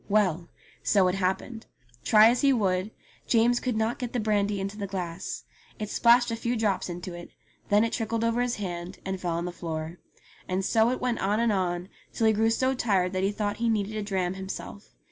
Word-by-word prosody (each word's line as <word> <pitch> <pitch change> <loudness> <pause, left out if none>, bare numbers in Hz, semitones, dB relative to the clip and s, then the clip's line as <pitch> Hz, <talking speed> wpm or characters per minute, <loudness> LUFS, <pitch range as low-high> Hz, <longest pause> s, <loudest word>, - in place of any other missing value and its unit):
Well! 185 -5 +1 0.3
so 195 -3 +3
it - - -1
happened. 195 +5 -2 0.4
Try 215 +1 +7
as 245 - 0
he 280 - +5
would, 190 -5 +1 0.4
James 240 +1 +3
could 250 -4 -2
not 220 +2 0
get 245 -2 -4
the 245 - 0
brandy 205 -2 +1
into 195 +1 -4
the 205 -1 -4
glass. 185 -2 -5 0.3
It 210 -1 -5
splashed 240 0 +4
a - - 0
few 235 +2 -2
drops 210 -5 0
into 175 +1 -6
it, 175 0 -9 0.4
then 205 +1 +5
it 230 - -1
trickled 230 0 -1
over 230 +1 +1
his 245 -1 0
hand, 180 -2 -5
and 190 -1 -3
fell 175 -2 -1
on 170 +1 -2
the 180 - -3
floor. 165 -1 -5 0.5
And 185 +1 -1
so 225 +2 +3
it 255 - -1
went 250 -2 0
on 205 +3 +1
and 230 -1 +2
on 180 -2 -1 0.3
till 225 - 0
he 220 - +5
grew 220 +1 +2
so 260 +3 +1
tired 195 -7 +1
that 185 - 0
he 195 +1 +1
thought 205 0 -2
he 235 0 0
needed 215 -1 0
a 215 - -2
dram 190 -3 -1
himself. 190 +2 -8
205 Hz, 220 wpm, -27 LUFS, 185-230 Hz, 0.5 s, Try